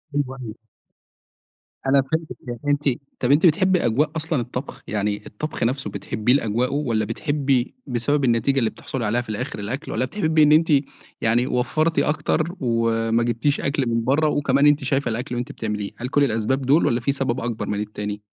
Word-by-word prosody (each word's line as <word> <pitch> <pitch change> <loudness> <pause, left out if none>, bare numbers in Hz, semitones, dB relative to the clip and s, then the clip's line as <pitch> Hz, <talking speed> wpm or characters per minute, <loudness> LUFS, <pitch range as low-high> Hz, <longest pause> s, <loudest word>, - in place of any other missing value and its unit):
أيوه، 135 -2 -1
أيوه. 110 -1 -7 1.3
أنا 135 +1 +4
فهمتِك 160 +4 -3
يعني 120 -1 -5
أنتِ 145 0 +1 0.4
طَب 125 +2 +1
أنتِ 155 +5 +5
بتحبي 185 +2 +3
أجواء 150 +7 +2
أصلًا 160 -4 0
الطبخ؟ 125 +3 -6
يعني 105 0 -1
الطبخ 150 +7 -5
نفْسه 125 -2 -1
بتحبيه 105 +4 0
لأجواؤه 125 0 +1
والَّا 115 -7 0
بتحبي 140 -2 0
بسبب 135 +4 0
النتيجة 125 +3 +2
اللي 115 -3 +1
بتحصُلي 125 -5 -5
عليها 120 +4 +1
في 120 - -12
الآخر 105 -1 -4
الأكل، 125 +9 -4
والَّا 125 +4 0
بتحبي 160 -2 +2
إن 150 - +5
أنتِ 160 +1 +5 0.5
يعني 120 +3 +2
وفرّتِ 155 +6 +1
أكتر، 155 +3 0
وما 115 -1 +1
جِبتيش 120 +5 0
أكل 140 -3 0
من 115 0 0
برّه، 145 +5 +2
وكمان 140 0 +3
أنتِ 145 -1 +3
شايفة 135 -1 0
الأكل 120 +2 -3
وأنتِ 120 0 -3
بتعمليه، 105 -2 -4
هل 125 - -4
كُلّ 145 +2 +2
الأسباب 115 +2 0
دول 140 +5 +3
والَّا 120 - +2
في 130 +4 0
سبب 135 -3 -1
أكبر 115 -1 -3
من 105 0 -2
التاني؟ 105 0 -4
130 Hz, 180 wpm, -22 LUFS, 115-145 Hz, 1.3 s, أنتِ